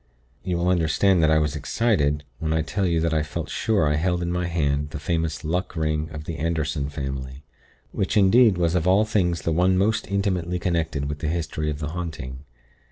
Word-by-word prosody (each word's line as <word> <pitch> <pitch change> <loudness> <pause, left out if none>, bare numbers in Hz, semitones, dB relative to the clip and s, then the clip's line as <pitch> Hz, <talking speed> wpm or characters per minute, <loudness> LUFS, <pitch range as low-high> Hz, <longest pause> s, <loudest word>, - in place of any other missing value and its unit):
"You 90 -2 -1
will 85 +1 0
understand 90 +2 +3
that 80 - +4
I 80 - +4
was 75 -1 0
excited, 75 -3 +1 0.2
when 80 -1 -1
I 80 0 +1
tell 95 +4 -1
you 85 -1 +1
that 85 0 0
I 80 - +2
felt 75 -2 -5
sure 100 -9 +1
I 75 0 +1
held 90 +2 0
in 85 - -2
my 90 0 -1
hand 75 -3 0
the 80 -1 -6
famous 80 +1 -2
Luck 90 +5 -2
Ring 75 0 -1
of 75 -1 -7
the 80 +1 -5
Anderson 75 -2 -1
family; 70 -1 -5 0.5
which, - - -1
indeed, 105 +1 +5
was 85 -1 +1
of 90 -1 +1
all 100 +4 +4
things 90 -6 0
the 85 - 0
one 90 +3 +3
most 110 +3 +1
intimately 95 -3 -1
connected 80 -5 -1
with 75 0 -4
the 75 - -2
history 75 -1 -2
of 75 - -3
the 75 0 -4
haunting. 80 -7 -5
80 Hz, 210 wpm, -24 LUFS, 75-90 Hz, 0.5 s, indeed